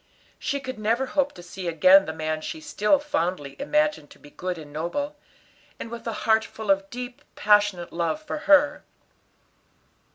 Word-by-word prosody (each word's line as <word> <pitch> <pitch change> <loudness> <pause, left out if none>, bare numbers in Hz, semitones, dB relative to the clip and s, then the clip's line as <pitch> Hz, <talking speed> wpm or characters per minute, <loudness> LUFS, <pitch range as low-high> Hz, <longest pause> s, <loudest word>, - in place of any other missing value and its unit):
She 280 -2 -2
could 260 -4 -7
never 230 +5 +1
hope 280 +2 0
to 175 - -12
see 180 +1 -7
again 185 +4 +6
the - - -3
man 155 0 -3
she 320 - -5
still 290 -5 +2
fondly 180 - -2
imagined 300 - 0
to - - -16
be 145 - -16
good 180 -1 -4
and 150 -2 -11
noble, 285 - -3 0.6
and 230 - -7
with 235 0 -7
a - - 0
heart 220 0 +4
full 220 -2 -3
of 195 0 +1
deep, 245 0 -7
passionate 205 -4 +2
love 170 - -1
for 310 0 -5
her. 295 0 +5
210 Hz, 170 wpm, -25 LUFS, 175-280 Hz, 0.6 s, again